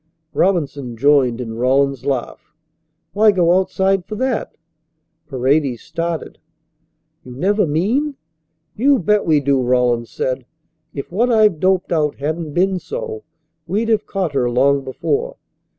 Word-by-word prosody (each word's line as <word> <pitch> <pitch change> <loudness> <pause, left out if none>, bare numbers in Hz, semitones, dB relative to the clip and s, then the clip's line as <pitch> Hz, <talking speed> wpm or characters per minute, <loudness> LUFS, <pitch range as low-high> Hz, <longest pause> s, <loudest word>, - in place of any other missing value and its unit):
Robinson 145 -10 0
joined 135 -2 +3
in 115 -2 -5
Rawlins's 135 +1 +1
laugh. 135 +2 -4 0.6
"Why 215 +1 +5
go 180 -1 +3
outside 190 0 0
for 215 - -7
that?" 255 0 -2 0.7
Paredes 135 -2 0
started. 170 -1 -4 0.8
"You 125 -1 -11
never 200 +6 +1
mean 230 - 0 0.3
" 155 0 -51
"You 280 0 +5
bet 210 0 +1
we 155 -2 +4
do," 140 -1 +1
Rawlins 125 -2 +1
said. 130 -1 -3 0.4
"If 140 - -7
what 230 +7 +1
I've 215 -7 +4
doped 185 +1 +1
out 150 -3 +1
hadn't 155 +2 -4
been 185 +2 +1
so 455 - -6 0.5
we'd 215 +6 -1
have 215 -2 +1
caught 185 -6 -2
her 125 -3 +1
long 135 +3 +2
before. 445 - -2
160 Hz, 135 wpm, -19 LUFS, 135-200 Hz, 0.8 s, Why